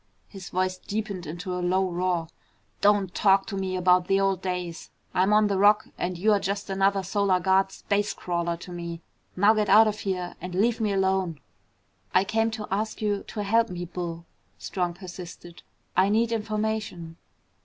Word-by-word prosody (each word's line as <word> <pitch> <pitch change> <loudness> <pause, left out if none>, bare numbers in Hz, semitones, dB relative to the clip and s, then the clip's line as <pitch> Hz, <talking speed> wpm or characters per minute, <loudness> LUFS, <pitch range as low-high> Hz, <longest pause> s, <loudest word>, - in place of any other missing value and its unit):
His 195 -3 -10
voice 185 0 -1
deepened 200 -5 -4
into 175 +4 -5
a 180 - -2
low 185 +2 +1
roar. 175 -2 -1 0.5
"Don't 200 -2 +3
talk 195 -1 +4
to 200 - -5
me 190 -1 -2
about 180 0 +3
the 195 0 +3
old 195 -1 +1
days! 180 -2 -4 0.2
I'm 190 +3 +2
on 215 0 +5
the 200 -2 0
Rock 205 +1 +4
and 180 0 -3
you're 205 +3 +3
just 200 +1 -3
another 195 0 +2
Solar 195 -1 +1
Guard 190 +2 +2
space 205 +1 -1
crawler 170 -1 -2
to 180 +1 -10
me. 170 -1 -6 0.3
Now 205 +4 +5
get 210 -2 0
out 215 +3 +7
of 210 0 -2
here 185 -4 -3
and 180 0 -6
leave 230 +4 +2
me 215 -2 +1
alone." 190 -4 0 0.8
"I 185 - +6
came 225 +3 +1
to 220 -1 -6
ask 215 +3 -2
you 205 -2 0
to 210 - -4
help 225 +3 +2
me, 175 -1 -5
Bull," 170 -1 -6 0.3
Strong 175 -2 -3
persisted. 175 -2 -10 0.3
"I 190 +1 +4
need 225 +2 +2
information." 215 -6 -3
190 Hz, 175 wpm, -26 LUFS, 180-205 Hz, 0.8 s, out